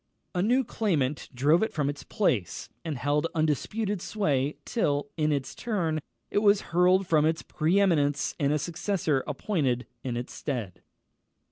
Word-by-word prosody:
A 180 - 0
new 245 +7 +3
claimant 155 - -1
drove 145 +6 +3
it 220 - 0
from 150 -4 0
its 145 0 -3
place, 130 - -1
and 155 -4 -3
held 145 +4 +1
undisputed 180 - 0
sway 150 -10 0
till, 145 -10 0
in 155 -1 +1
its 135 -2 -2
turn, 175 -9 -1 0.3
it - - +3
was 205 -1 +4
hurled 180 +2 +4
from 155 -4 +3
its 160 +1 +1
pre 165 +5 +1
eminence, 150 -7 +2
and 140 -1 +2
a 150 - +2
successor 160 -2 -1
appointed 140 - -1 0.2
in 125 -2 -2
its 120 - -5
stead. 115 - -4
155 Hz, 155 wpm, -28 LUFS, 140-190 Hz, 0.3 s, was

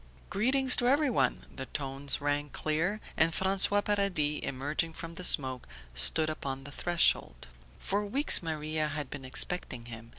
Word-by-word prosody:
"Greetings 260 +4 +4
to 245 - +1
everyone!" 280 -1 +1
The 135 - -6
tones 140 -1 -3
rang 145 0 -1
clear, 165 +9 -2 0.2
and 160 +1 +3
François 195 +2 +3
Paradis, 190 -8 +1
emerging 145 +5 -2
from 165 0 -8
the 180 - -7
smoke, 130 -6 +3 0.3
stood 155 - +3
upon 135 -3 -5
the 145 - -10
threshold. 165 - 0 0.3
For 205 +1 -2
weeks 265 +9 +2
Maria 155 -1 -2
had 150 -2 -5
been 140 -2 -7
expecting 130 -3 -1
him. 115 -1 -9
155 Hz, 145 wpm, -29 LUFS, 140-195 Hz, 0.3 s, Greetings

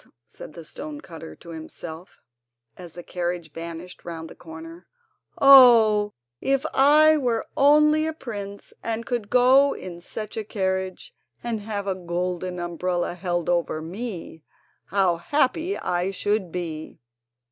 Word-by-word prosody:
said - - -12
the 165 - -10
stone 295 - -8
cutter 165 - -10
to 170 - -15
himself, 160 +1 -9 0.5
as 175 -3 -11
the 175 - -9
carriage 175 -3 -4
vanished 170 +2 -8
round 165 -1 -6
the - - -11
corner. 165 +1 -11 0.5
"Oh, 230 -6 +7 0.3
if 270 0 +1
I 305 +3 +6
were 240 -5 0
only 300 +2 +5
a 320 - -2
prince, 205 -8 -7
and 230 0 -2
could 235 -5 -3
go 260 +3 +5
in 175 -2 -8
such 215 +5 -6
a 220 - -2
carriage 190 -3 -3 0.3
and 235 -2 -2
have 205 -1 -4
a 195 - 0
golden 180 0 -3
umbrella 175 0 -2
held 175 -1 -2
over 170 -3 0
me, 175 -1 -7 0.4
how 190 -4 +2
happy 300 - 0
I 180 +1 -1
should 195 -1 -1
be!" 160 -3 -6
190 Hz, 135 wpm, -24 LUFS, 175-240 Hz, 0.5 s, Oh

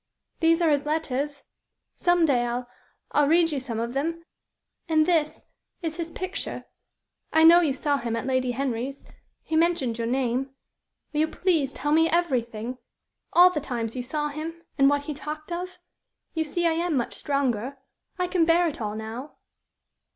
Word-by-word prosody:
"These 330 +1 +3
are 320 - +4
his 290 0 +1
letters. 290 -2 -2 0.5
Some 350 -1 +3
day 255 -5 +2
I'll 240 +1 -3 0.4
I'll 295 -1 +3
read 330 +1 +4
you 285 - -1
some 240 -4 -4
of 235 +1 -3
them; 330 +5 -2 0.6
and 310 -1 +4
this 315 -3 0 0.4
is 320 0 -3
his 335 -1 -3
picture. 370 +3 -5 0.7
I 320 - +5
know 335 +2 +9
you 300 -6 +1
saw 285 +1 +1
him 235 -3 -3
at 230 - -3
Lady 255 -1 0
Henry's. 265 +1 -3 0.4
He 320 - -3
mentioned 315 -8 +1
your 230 - -1
name. 260 +1 -1 0.6
Will 300 - 0
you 310 - +3
please 320 -6 +1
tell 295 +1 -3
me 325 +1 +4
everything 250 -7 -1 0.5
all 360 +1 +8
the 300 -4 -2
times 235 -4 -3
you 250 - -2
saw 295 +4 -2
him, 325 +3 -6
and 275 0 +5
what 285 0 +1
he 300 - -4
talked 305 +2 -7
of? 360 +1 -4 0.6
You 320 -1 0
see 345 +3 -1
I 335 - +4
am 335 -2 0
much 240 - -1
stronger. 270 -2 -1 0.4
I 360 - +1
can 360 -1 +2
bear 335 +1 +4
it 295 - -5
all 210 -1 -3
now." 225 +6 -7
295 Hz, 175 wpm, -26 LUFS, 255-330 Hz, 0.7 s, know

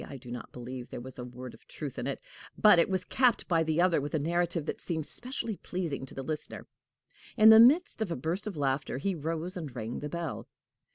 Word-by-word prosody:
I 140 - -8
do 125 -1 -11
not 125 - -7
believe 125 0 -8
there - - -7
was 130 +1 -10
a - - -5
word 125 0 -9
of - - -19
truth - - -7
in - - -3
it. - - -3 0.4
But 210 -5 +6
it 170 - +3
was 185 -1 -1
capped 250 -2 +2
by 165 -2 +2
the 160 0 0
other 175 -4 +3
with 145 +3 -4
a - - +1
narrative 170 +1 -1
that - - -2
seemed 160 -4 -3
specially 240 - +3
pleasing 165 -7 -4
to - - -11
the 135 - -5
listener. 150 +3 -5 0.7
In 220 -1 +8
the 220 0 +9
midst 270 +3 +5
of 215 - -1
a 165 - -2
burst 170 +10 -3
of 195 -6 -5
laughter, 135 -2 -1
he 195 +8 -1
rose 165 +2 -4
and 155 -8 -7
rang 115 0 -5
the 150 - -5
bell. 170 -3 -5
160 Hz, 235 wpm, -29 LUFS, 135-185 Hz, 0.7 s, the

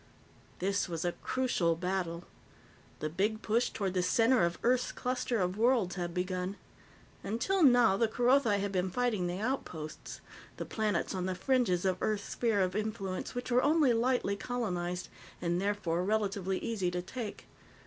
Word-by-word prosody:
This 195 +1 0
was 165 0 -3
a 175 - +2
crucial 185 -8 0
battle. 180 -1 -2 0.8
The 155 - 0
big 210 +7 -1
push 230 +3 +2
toward 195 -3 -2
the 185 - +1
center 225 +7 +3
of 170 0 0
Earth's 250 +1 +2
cluster 250 -2 -1
of 185 +2 -1
worlds 230 -6 +3
had 175 -2 -3
begun. 180 +1 -2 0.7
Until 235 - 0
now, 245 - +6
the 230 - +3
Kerothi 240 -2 +3
had 200 0 -2
been 185 -1 0
fighting 215 -3 0
the 175 +1 -3
outposts, 190 - -4 0.4
the - - -4
planets 210 -5 -1
on 185 -1 -2
the 185 - -1
fringes 195 -4 +1
of 185 -1 0
Earth's 210 -2 -1
sphere 225 -4 +1
of 185 0 0
influence 210 -1 -3
which 245 0 -4
were 245 +1 +5
only 295 -3 +4
lightly 235 -3 +1
colonized, 185 -6 -3 0.3
and 175 0 0
therefore 195 -4 0
relatively 195 -2 0
easy 200 -6 -1
to 180 0 -3
take. 220 +2 -6
200 Hz, 160 wpm, -31 LUFS, 180-240 Hz, 0.8 s, now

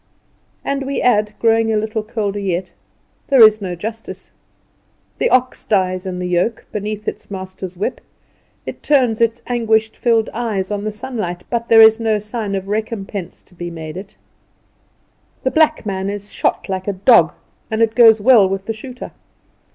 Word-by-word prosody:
And, 275 -1 -2
we 275 - -2
add, 210 -3 +2
growing 225 -1 +2
a 215 - +1
little 220 +1 -2
colder 210 -2 -3
yet. 185 -2 -3 0.5
"There 265 -5 +7
is 215 0 +6
no 180 -3 -4
justice. 220 +5 -8 0.9
The - - +2
ox 255 0 +1
dies 185 -2 0
in 180 -1 -4
the 180 - -4
yoke, 180 +6 -1
beneath 210 0 -5
its - - -5
master's 185 -1 -7
whip; 200 - -3 0.6
it - - -7
turns 250 -6 +2
its 230 0 +1
anguish 220 -2 +1
filled 230 -2 +1
eyes 215 -5 -2
on 205 0 -3
the 215 - -2
sunlight, 210 -6 -5
but 235 -1 -1
there 225 -1 +7
is 220 0 +7
no 220 -2 +1
sign 210 -1 -4
of 195 0 -4
recompense 205 -3 -4
to - - -25
be 175 0 -6
made 160 -2 -8
it. 190 +2 -9 1.3
The 260 - +1
black 310 -5 +2
man 190 -1 -2
is 205 0 -7
shot - - -1
like 190 -1 -4
a 205 - 0
dog, 185 -5 +4 0.4
and 220 +1 +1
it 225 -1 +1
goes 225 -2 +6
well 215 -3 +5
with 195 0 -3
the 225 - -2
shooter. 250 +3 -9
215 Hz, 175 wpm, -18 LUFS, 190-230 Hz, 1.3 s, There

